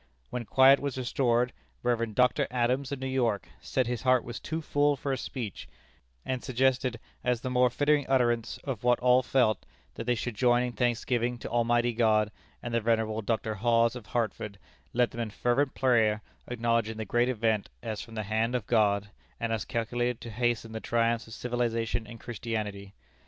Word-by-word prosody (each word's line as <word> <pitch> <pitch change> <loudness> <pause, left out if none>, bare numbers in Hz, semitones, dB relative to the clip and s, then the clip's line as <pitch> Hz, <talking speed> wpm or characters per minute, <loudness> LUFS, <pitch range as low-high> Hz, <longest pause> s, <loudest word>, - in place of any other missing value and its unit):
When 125 -2 -3
quiet 135 +5 +6
was 140 -2 -3
restored, 125 -1 +1 0.3
Rev. 115 -3 0
Dr. 125 -3 +3
Adams, 125 +3 0
of 140 - -2
New 130 - -5
York, 125 -6 0
said 130 - 0
his 120 0 -3
heart 130 -1 +3
was 120 0 -6
too 160 +1 -3
full 145 -2 +2
for 140 +1 -3
a - - +1
speech, 115 -9 -6 0.6
and 130 -1 -2
suggested, 130 -1 +1 0.2
as 125 -2 +1
the 130 - -3
more 125 0 +4
fitting 145 +3 +2
utterance 120 -3 +1
of 130 -6 -4
what 125 0 +3
all 125 +1 +5
felt, 120 -4 +2 0.3
that 115 - -6
they 125 0 +2
should 120 +2 -3
join 120 +2 +3
in 125 - -2
thanksgiving 120 +1 0
to - - -7
Almighty 120 0 +2
God, 110 -2 +3 0.3
and 120 - -4
the 115 - +2
venerable 110 -1 +1
Dr. 110 +1 -1
Hawes, 115 +2 +2
of 120 -5 -9
Hartford, 105 -3 -2 0.3
led 120 0 +2
them 120 - -4
in 115 - -2
fervent 125 +6 0
prayer, 110 -5 +3 0.2
acknowledging 115 -2 0
the 110 - -4
great 120 +4 +2
event 110 -4 0
as 110 -1 -4
from 115 - -10
the 110 - -2
hand 110 +4 0
of 120 -5 -1
God, 105 -3 +2 0.3
and 115 -1 -1
as 110 -4 -2
calculated 120 +1 -1
to 115 - -7
hasten 120 0 -1
the 110 - -4
triumphs 115 0 0
of 110 - -10
civilization 120 -2 -1
and 115 -1 -10
Christianity. 105 -4 -5
120 Hz, 185 wpm, -29 LUFS, 110-125 Hz, 0.6 s, quiet